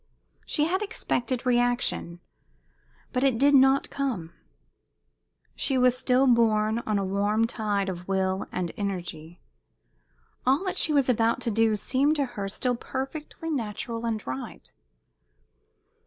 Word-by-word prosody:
She 300 - +1
had 370 +5 0
expected 260 - -2
reaction, 245 -8 0 0.9
but 250 0 0
it 265 -4 +3
did 285 +4 +4
not 270 0 +4
come. 230 -13 -3 1.2
She 270 - 0
was 250 -1 +4
still 255 +1 +2
borne 225 -3 +3
on 215 -1 +1
a 195 - -1
warm 205 +3 +1
tide 210 -4 -1
of 180 -1 -5
will 190 0 0
and 180 -2 -3
energy. 175 -4 -5 1.0
All 270 +7 +2
that 370 - -2
she 315 - +3
was 280 -3 +3
about 230 -2 +2
to 230 - -1
do 220 0 +2
seemed 275 +8 +1
to 285 -2 +1
her 205 -6 -5
still 245 +5 -1
perfectly 295 +6 -5
natural 230 -2 -3
and 220 -2 -3
right. 130 +1 -7
235 Hz, 135 wpm, -26 LUFS, 200-265 Hz, 1.2 s, did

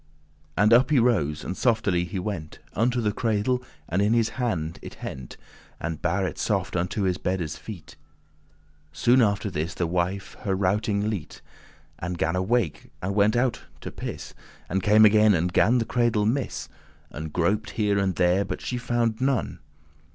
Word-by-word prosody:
And 105 +3 +5
up 125 +4 +5
he 150 - +3
rose, 95 - +2
and 95 - -4
softely 100 -8 +1
he 95 +3 -5
went 90 -5 -4 0.2
Unto 120 +3 +1
the 105 -2 +1
cradle, 115 +3 0 0.3
and 90 +4 0
in 105 +2 +3
his 115 -1 +2
hand 90 -11 -2
it - - -9
hent*, 65 -2 -7
*took - - -18 0.4
And 80 -1 -4
bare 90 +5 0
it - - -5
soft 100 -4 -1
unto 90 +4 -1
his 95 -1 0
beddes 90 -5 -2
feet. 100 -7 -10 0.9
Soon 125 +9 +4
after 100 -2 +1
this 85 +1 -3
the 90 - 0
wife 90 +3 -2
*her 95 -2 -1
routing 100 +2 0
lete*, 100 -8 -4
*stopped - - -16
snoring* - - -26
And 90 +1 -4
gan 80 +2 0
awake, 95 -1 -1
and 95 +2 -1
went 105 +2 +3
her 120 - +3
out 130 -2 -1 0.2
to - - -6
piss - - -7 0.3
And 95 +3 -1
came 105 +3 +6
again 105 -1 +6
and 90 +1 0
gan 115 +7 +4
the 115 - 0
cradle 120 -4 +1
miss 125 +4 -1 0.4
And 75 +2 -6
groped 100 +6 0
here 105 -2 +2
and 95 -2 0
there, 90 +3 +3
but 100 - -5
she 125 - -3
found 120 -1 0
none. 135 -2 0
100 Hz, 185 wpm, -25 LUFS, 90-115 Hz, 0.9 s, came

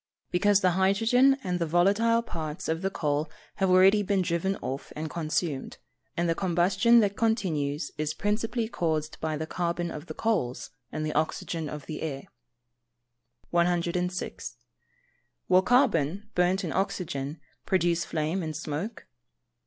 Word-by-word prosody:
_ - - -44
Because 200 +2 +3
the 185 - +4
hydrogen 225 +9 +4
and 180 -1 -1
the 170 - 0
volatile 205 +8 +3
parts 160 -6 -5
of 160 +1 -1
the 195 - 0
coal 150 -3 -1 0.3
have 190 -1 +2
already 190 +3 +6
been 200 -2 +1
driven 175 +3 0
off 135 -3 -6
and 155 0 -4
consumed, 155 -3 -2 0.4
and 170 0 +1
the 165 - +2
combustion 190 +6 +3
that 200 -1 0
continues 160 -11 0
is 155 0 -1
principally 220 +3 -1
caused 155 -7 -2
by 155 -1 -1
the 160 - -3
carbon 170 +1 -2
of 150 +2 -8
the - - -7
coals, 200 - -1 0.2
and 155 0 -3
the 155 - -2
oxygen 160 0 -2
of 150 -1 -7
the 155 - -6
air. 140 -4 -4 1.3
106. 175 +1 -1 0.9
_Will 185 0 +5
carbon, 210 - +2
burnt 180 +2 +2
in 165 - -3
oxygen, 170 -7 -2 0.3
produce 175 -2 +2
flame 160 +4 -2
and 155 -2 -4
smoke? 160 +8 -5
175 Hz, 145 wpm, -28 LUFS, 155-195 Hz, 1.3 s, already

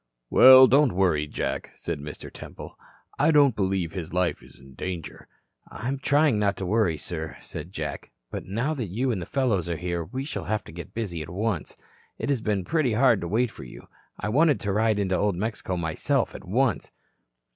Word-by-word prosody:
"Well, 130 0 +10
don't 135 0 +4
worry, 85 -6 +2
Jack," - - -4
said - - -4
Mr. 75 +1 -9
Temple. - - -10 0.4
"I 145 +3 +4
don't 145 -6 +5
believe 95 -4 -1
his 90 -2 -6
life 90 -1 0
is - - -17
in 65 0 -15
danger." 85 -4 -6 0.4
"I'm 130 +5 -4
trying 145 -4 +3
not 100 -1 +1
to 95 - -4
worry, 95 -4 +1
sir," 80 0 -5
said 80 +3 -8
Jack. 100 - -5 0.2
"But - - -5
now 115 +11 -1
that 125 -8 -4
you 120 +8 -1
and 100 -6 -2
the 85 - -7
fellows 110 - 0
are 85 - -2
here, 85 -1 -3
we 130 +11 -5
shall 150 - -5
have 110 -1 -1
to - - -12
get 85 +2 -10
busy 95 -8 -3
at 80 - -7
once. 100 -1 -3 0.4
It - - -3
has 135 -5 +1
been 100 -4 -1
pretty 155 -7 +1
hard 120 -2 +4
to 85 - -3
wait 115 +6 +1
for - - -11
you. 60 - -12 0.3
I 105 - -2
wanted 150 +4 +3
to 100 - -1
ride 110 0 +2
into 95 -2 0
Old 100 0 +1
Mexico 95 -2 -3
myself 80 -2 0
at - - -10
once." 115 +4 0
105 Hz, 200 wpm, -26 LUFS, 85-125 Hz, 0.4 s, Well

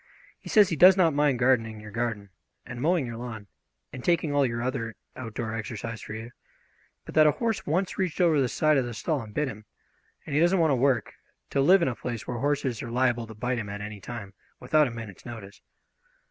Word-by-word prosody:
He - - -11
says 210 -3 +6
he 165 - -1
does 185 +5 +7
not 170 -4 +4
mind 145 -2 +2
gardening 115 -3 +2
your 105 0 -10
garden 110 -3 -3 0.3
and 120 0 -7
mowing 165 -1 +2
your 120 -1 -6
lawn 115 -3 -7 0.5
and 130 -2 -7
taking 170 -4 +1
all 140 -2 +3
your 115 0 -3
other 120 -4 -3 0.2
outdoor 115 -2 -5
exercise 115 0 -5
for 110 - -7
you, 115 +2 -7 0.7
but - - -9
that 155 -1 +6
a 150 - +4
horse 225 -3 -2
once 180 +7 -1
reached 185 -4 -1
over 165 -5 +4
the 130 - +1
side 155 +2 +2
of 130 - +1
the 120 -2 -6
stall 150 +5 -1
and 105 -2 -11
bit 150 -1 +1
him, 110 -4 -8 0.6
and 145 - -6
he 150 - +3
doesn't 175 +3 +4
want 160 -3 +3
to - - +3
work 125 -3 +1 0.4
to 140 - +2
live 180 +6 +6
in - - +2
a 130 - 0
place 120 -1 -5
where 120 -1 -3
horses 140 -4 -1
are 115 - -6
liable 120 -1 +1
to 110 - -10
bite 125 +3 -2
him 105 -2 -5
at 100 0 -5
any 105 0 -7
time 105 -3 -7 0.3
without 150 +4 +3
a - - -5
minute's 115 -5 -9
notice." 110 -5 -10
125 Hz, 230 wpm, -27 LUFS, 115-150 Hz, 0.7 s, does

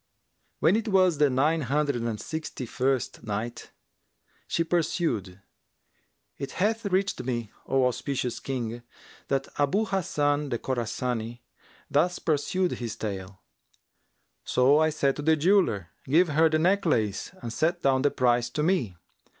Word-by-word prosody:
When 185 - +3
it 225 +1 -1
was 185 -6 +3
the 150 -1 +5
Nine 150 +5 +2
Hundred 140 0 0
and 115 -2 -2
Sixty 160 -5 -5
first 130 0 -1
Night, 110 +3 -4 0.8
She 165 - +1
pursued, 155 - -1 1.0
It 140 - -5
hath 215 +3 0
reached 195 +1 0
me, 120 -4 -3 0.2
O 135 -1 +2
auspicious 125 -1 -2
King, 120 -3 -4 0.5
that 135 -1 0
Abu 170 +10 +2
Hasan 150 -7 0
the 120 - -1
Khorasani 120 -1 -3 0.5
thus 175 +5 +2
pursued 175 +4 0
his 120 -3 -4
tale, 95 -2 -6 1.0
"So 135 +4 +4
I 155 0 +4
said 140 -3 0
to - - -3
the 160 +2 +4
jeweller, 155 - +2 0.2
'Give 165 +6 +4
her 160 +2 +4
the 155 - +2
necklace 155 - +1
and 115 -7 -6
set 170 +5 0
down 130 -1 +3
the 145 - +3
price 120 -2 +1
to 150 +5 -2
me.' 145 - 0
140 Hz, 140 wpm, -27 LUFS, 120-165 Hz, 1.0 s, the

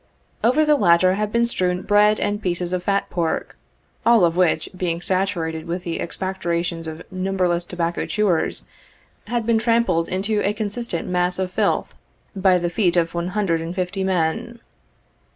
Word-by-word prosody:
Over 280 +7 +4
the 300 0 +4
latter 175 -2 +4
had 210 +1 -2
been 235 +1 +2
strewn 180 -5 0
bread 210 +1 +4
and 205 +1 -1
pieces 180 -1 -1
of 180 - 0
fat 200 +2 0
pork, 170 -2 -2 0.5
all 230 -6 +5
of 165 0 0
which 175 -3 +2
being 175 -2 -2
saturated 175 -4 -1
with 175 +2 -3
the 170 -2 -3
expectorations 170 -2 -3
of 160 +1 -7
numberless 185 -2 0
tobacco 170 -1 -2
chewers, 205 -6 0 0.6
had 235 0 -1
been 230 -1 +3
trampled 230 -7 +2
into 205 +3 0
a 205 - +1
consistent 210 -3 -3
mass 180 0 0
of 185 -1 -2
filth, - - 0 0.4
by 190 -1 +4
the 175 -1 -2
feet 180 -3 +1
of 165 -1 +1
one 170 0 -2
hundred 185 -4 0
and 165 +2 -5
fifty 190 +1 -2
men. 190 +6 -1
185 Hz, 165 wpm, -22 LUFS, 170-205 Hz, 0.6 s, all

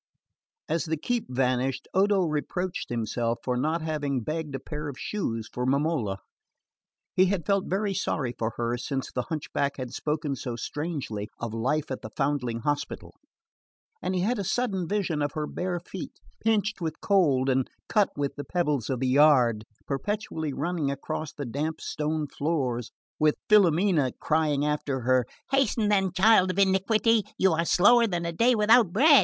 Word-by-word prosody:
As 165 - 0
the 160 0 -1
keep 240 +9 -1
vanished 130 0 0
Odo 195 0 +3
reproached 175 +3 -2
himself 115 0 -1
for 125 - -1
not 155 +6 0
having 145 -5 -1
begged 155 +3 -4
a - - -3
pair 150 +3 -6
of 140 -3 -6
shoes 115 - -3
for 125 - -2
Momola. 135 -6 0 1.0
He 185 +1 +4
had 185 -4 -1
felt 200 -1 +1
very 200 +1 0
sorry 135 -8 -1
for 110 0 -1
her 120 +1 -1
since 135 +1 -3
the 125 - -1
hunchback 140 -2 -2
had 130 -3 -5
spoken 150 -2 -2
so 120 -1 -5
strangely 130 -5 -4
of 115 -2 -5
life 135 +6 -1
at 130 - -4
the 110 - -7
foundling 135 -5 -1
hospital; 145 +3 -3 0.9
and 185 - -1
he 180 - +1
had 225 +4 0
a - - -1
sudden 190 -3 -1
vision 180 -6 -1
of 145 -1 -1
her 155 -1 -2
bare 180 +2 -3
feet, 185 +2 -8 0.3
pinched 215 -2 +1
with 160 -2 -3
cold 150 -10 +3
and 130 -1 +1 0.2
cut 210 -2 +3
with 140 -1 -2
the 145 - -4
pebbles 150 - -1
of 130 -2 -2
the 130 - +1
yard, 130 -6 +4 0.2
perpetually 160 +1 -3
running 155 0 -1
across 140 +2 -4
the 145 - -6
damp 150 +6 -3
stone 155 0 -2
floors, 135 -6 -2 0.3
with 155 -1 +4
Filomena 180 -7 +4
crying 150 -2 +1
after 145 -3 -1
her: 130 0 +2 0.2
"Hasten 240 -5 +2
then, 195 -3 +2
child 190 0 +5
of 185 - -2
iniquity! 200 +4 +3 0.2
You 190 - +4
are 165 +1 +1
slower 230 +8 +5
than 175 -4 -2
a 170 - -1
day 235 +8 +4
without 220 -2 +5
bread!" 285 - +7
155 Hz, 170 wpm, -27 LUFS, 130-190 Hz, 1.0 s, bread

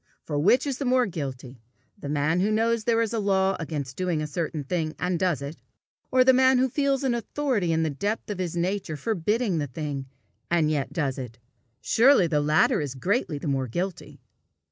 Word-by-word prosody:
For 145 -2 -2
which 225 - +4
is 275 -3 -3
the 280 - -2
more 255 0 +3
guilty 135 - -6 0.3
the 170 -9 -8
man 150 +3 +1
who 200 +3 +2
knows 225 0 +1
there 230 -1 +3
is 225 0 -3
a 225 - 0
law 195 -1 +2
against 145 -4 -4
doing 180 -4 0
a 155 - -2
certain 155 0 -3
thing 155 +1 -2
and 180 -1 -1
does 175 -7 0
it, 145 +3 -6 0.5
or 255 0 +5
the 260 +1 +6
man 260 0 +5
who 260 +1 +2
feels 275 +1 0
an 260 -3 +1
authority 235 -5 -1
in 160 0 +1
the 160 - 0
depth 205 +9 -3
of 200 - -5
his 175 -2 -3
nature 180 -2 -2
forbidding 210 - 0
the 145 - -2
thing, 140 0 -5 0.4
and 165 -3 +2
yet 145 -3 -1
does 140 -5 -2
it? 125 -3 -7 0.4
Surely 245 -4 +5
the 155 -3 +1
latter 150 +1 +3
is 140 -3 -4
greatly 175 - -1
the 145 - -6
more 135 -2 0
guilty. 175 +9 -5
175 Hz, 205 wpm, -26 LUFS, 150-225 Hz, 0.5 s, the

